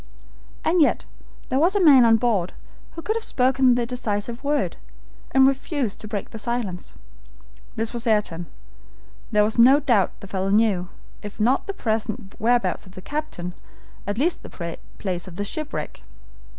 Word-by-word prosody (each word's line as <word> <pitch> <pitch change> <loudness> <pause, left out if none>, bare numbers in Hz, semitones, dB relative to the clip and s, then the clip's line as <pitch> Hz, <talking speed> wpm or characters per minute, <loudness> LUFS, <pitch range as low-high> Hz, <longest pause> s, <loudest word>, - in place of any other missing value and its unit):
And 340 +1 +3
yet 295 - +2 0.4
there 265 - +1
was 350 +6 +3
a - - +3
man 280 -9 +7
on 225 -1 +6
board 215 -7 0 0.4
who 330 - -8
could 435 - -1
have 455 - -2
spoken 260 - +3
the 240 -1 0
decisive 235 0 -3
word, 290 +1 0 0.5
and 265 0 +5
refused 270 - -1
to 215 - -7
break 205 -2 -5
his 225 - -6
silence. 210 -6 -3 0.8
This 225 +1 -2
was 235 0 -4
Ayrton. 190 -6 0 0.8
There 210 -1 +4
was 220 +2 0
no 265 +5 +7
doubt 235 -10 +1
the - - -10
fellow 190 0 -2
knew, 200 -4 +2 0.3
if 205 +1 -9
not 245 - +2
the 395 - -3
present 220 - -3
whereabouts 240 -3 +1
of 185 - -15
the 185 - -8
captain, 285 -13 -4 0.5
at 205 +1 -2
least 325 +7 +1
the 170 -2 -7 0.2
place 180 -3 -3
of 185 +3 -5
shipwreck. 305 +6 -5
230 Hz, 165 wpm, -23 LUFS, 205-270 Hz, 0.8 s, man